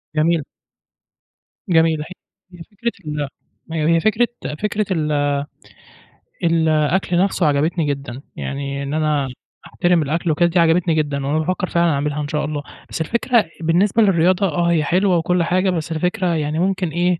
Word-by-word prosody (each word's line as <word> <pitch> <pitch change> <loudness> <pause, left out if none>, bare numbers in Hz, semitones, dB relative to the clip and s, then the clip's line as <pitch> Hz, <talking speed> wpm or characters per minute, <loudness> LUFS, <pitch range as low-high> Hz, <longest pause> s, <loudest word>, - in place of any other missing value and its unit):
جميل. 160 0 +2 1.3
جميل 160 -2 +3
هي - - -5 0.5
هي 175 -1 -10
فكرة 235 +3 -2
ال 150 -1 -3 0.4
هي 160 0 +2
هي - - +3
فكرة 220 +6 +2 0.3
فكرة 210 0 -1
ال 150 -3 0 1.1
الأكل 165 +2 +2
نفسُه 185 -1 +2
عجبتني 155 +3 +1
جدًا، 140 -3 -4
يعني 140 0 -4
إن 140 +1 -4
أنا 150 -3 +1 0.4
أحترم 175 -1 +1
الأكل 160 +3 -1
وكده 170 +3 +3
دي 170 +1 +1
عجبتني 165 0 +3
جدًا، 145 -3 -1
وأنا 150 +3 +1
بافكر 185 +3 -1
فعلًا 170 -1 +2
أعملها 145 +1 -1
إن 145 - -3
شاء 150 0 -1
الله، 145 -1 -4 0.3
بس - - -4
الفكرة 235 +5 +2 0.2
بالنسبة 185 +7 +2
للرياضة 185 -1 +3
آه، 170 +1 +1
هي 160 -3 +2
حلوة 180 +4 +2
وكُلّ 175 +1 +1
حاجة، 185 +3 +1
بس 170 -2 -2
الفكرة 180 +3 -1
يعني 155 0 -1
ممكن 185 -1 0
إيه 175 +2 0
165 Hz, 155 wpm, -20 LUFS, 150-180 Hz, 1.3 s, جميل